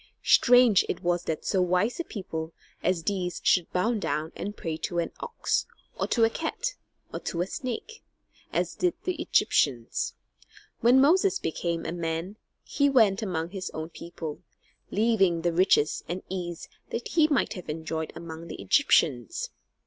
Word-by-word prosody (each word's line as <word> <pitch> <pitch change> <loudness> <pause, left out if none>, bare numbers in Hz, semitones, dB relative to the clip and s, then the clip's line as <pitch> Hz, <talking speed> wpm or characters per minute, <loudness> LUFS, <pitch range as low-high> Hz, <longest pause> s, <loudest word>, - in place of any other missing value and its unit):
Strange 245 -5 +6
it 170 - -3
was 175 0 0
that 160 - -3
so 190 - +2
wise 180 - +1
a - - 0
people 165 - -6 0.3
as 175 -2 0
these 180 -2 -2
should 180 -3 +3
bow 200 +7 +1
down 160 -7 -2
and 205 +1 -5
pray 165 -2 -3
to 175 +2 -4
an 170 -1 0
ox, 470 - -1 0.3
or - - -1
to 230 - +2
a 225 - +6
cat, - - -3 0.4
or - - -3
to 170 - -4
a 175 - +2
snake, 255 - -5 0.5
as - - 0
did 360 -2 0
the 370 - 0
Egyptians. 120 -5 +1 0.6
When 245 +3 +6
Moses 370 +8 +4
became 170 - -2
a - - -2
man, 170 +3 -3 0.3
he 285 0 +2
went 220 -6 +4
among 175 -5 -2
his 190 -1 -4
own 155 +1 -4
people, 165 -3 -7 0.5
leaving 195 -6 +2
the 175 -1 +1
riches 170 -4 +3
and 180 +2 -3
ease 175 -2 -5 0.2
that 235 - -4
he 315 -2 +4
might 285 -5 +1
have 180 -6 -9
enjoyed 160 0 -3
among 165 0 -8
the - - -8
Egyptians. 135 - +2
180 Hz, 165 wpm, -27 LUFS, 165-235 Hz, 0.6 s, Strange